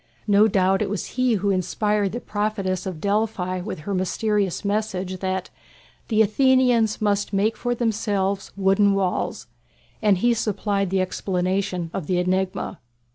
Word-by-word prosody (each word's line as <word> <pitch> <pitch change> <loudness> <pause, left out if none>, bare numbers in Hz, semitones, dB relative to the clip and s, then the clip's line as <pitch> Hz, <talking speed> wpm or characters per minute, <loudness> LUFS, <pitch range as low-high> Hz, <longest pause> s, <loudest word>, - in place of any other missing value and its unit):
No 205 +1 +5
doubt 190 -2 +2
it - - 0
was 205 -1 -3
he 255 -1 +2
who 200 -1 +1
inspired 200 +2 0
the 240 - -4
prophetess 205 -4 -2
of 180 -4 -5
Delphi 200 -2 -1
with 180 -4 -6
her 200 +6 -4
mysterious 200 +1 0
message 190 -3 -2
that 190 -1 -3 0.6
"the 220 -1 +4
Athenians 245 -1 +3
must 205 0 0
make 210 +3 +2
for 245 0 -2
themselves 205 -4 -1
wooden 195 +1 +3
walls," 190 -2 -1 0.6
and 205 -3 +4
he 240 +6 +3
supplied 205 -3 -1
the 190 0 +1
explanation 185 -1 -1
of 180 -6 -4
the 180 - +1
enigma. 185 +1 -1
200 Hz, 145 wpm, -23 LUFS, 185-215 Hz, 0.6 s, No